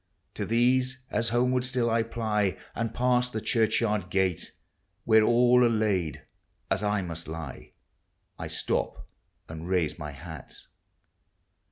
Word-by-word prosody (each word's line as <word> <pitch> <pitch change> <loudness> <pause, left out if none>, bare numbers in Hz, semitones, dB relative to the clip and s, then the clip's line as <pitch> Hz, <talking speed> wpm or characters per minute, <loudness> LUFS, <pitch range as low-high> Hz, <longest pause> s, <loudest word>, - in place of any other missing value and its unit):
To - - -4
these, 130 +3 +2
as 115 -1 +1
homeward 125 +2 +2
still 125 -2 0
I 115 0 +3
ply 110 -4 -1 0.2
And 115 -1 -2
pass 125 0 +2
the 110 - -3
churchyard 110 -4 +1
gate, 95 -2 0 0.5
Where 110 -1 +5
all 120 +2 +5
are 120 - +5
laid 100 - 0 0.5
as 95 +1 +2
1 105 -2 0
must 85 -1 -6
lie, 80 0 -7 0.7
I - - -4
stop - - -2 0.4
and 80 +1 -7
raise 90 -4 0
my 75 -1 -5
hat. 80 -1 -10
110 Hz, 135 wpm, -28 LUFS, 90-120 Hz, 0.7 s, Where